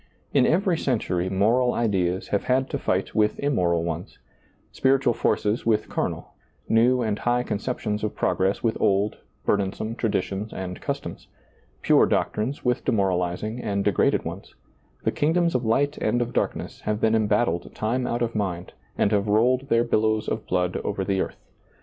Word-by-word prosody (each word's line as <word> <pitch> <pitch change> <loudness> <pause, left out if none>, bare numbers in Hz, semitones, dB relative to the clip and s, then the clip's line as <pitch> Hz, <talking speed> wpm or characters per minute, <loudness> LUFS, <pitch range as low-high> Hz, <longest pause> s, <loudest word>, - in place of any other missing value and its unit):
In 130 -3 +4
every 180 0 +2
century 95 -8 -1
moral 115 +6 +2
ideas 95 -5 0
have 100 - 0
had 130 +1 +1
to 140 - -2
fight 95 -5 -1
with 105 -1 +2
immoral 90 -12 +1
ones; 85 +1 -5 0.5
spiritual 135 -2 +2
forces 105 0 0
with 110 -2 +1
carnal; - - -3 0.3
new 120 +2 +3
and 110 -2 -1
high 120 0 +1
conceptions 105 -2 -3
of 105 - -2
progress 95 +1 0
with 115 -1 0
old, 100 +2 +2 0.3
burdensome 100 +2 0
traditions 105 -2 -2
and 90 -1 -6
customs; - - -5 0.6
pure - - +5
doctrines 125 +8 -1
with 125 0 +1
demoralizing 95 0 0
and 100 -3 -1
degraded 100 - +2
ones; - - -7 0.5
the - - +1
kingdoms 170 +3 +1
of 125 -1 0
light 140 +6 +1
and 120 - +1
of 120 0 -2
darkness - - -2
have 105 0 -2
been 110 0 +2
embattled 105 -5 +1
time 125 +4 -1
out 120 0 -1
of 115 0 -2
mind, 90 -4 -3 0.2
and 100 - +2
have 105 -1 +1
rolled 125 +6 +2
their 115 0 +4
billows 110 -2 +1
of - - -3
blood 90 -1 0
over 95 -2 -3
the 95 -1 0
earth. - - -5
110 Hz, 160 wpm, -25 LUFS, 100-125 Hz, 0.6 s, pure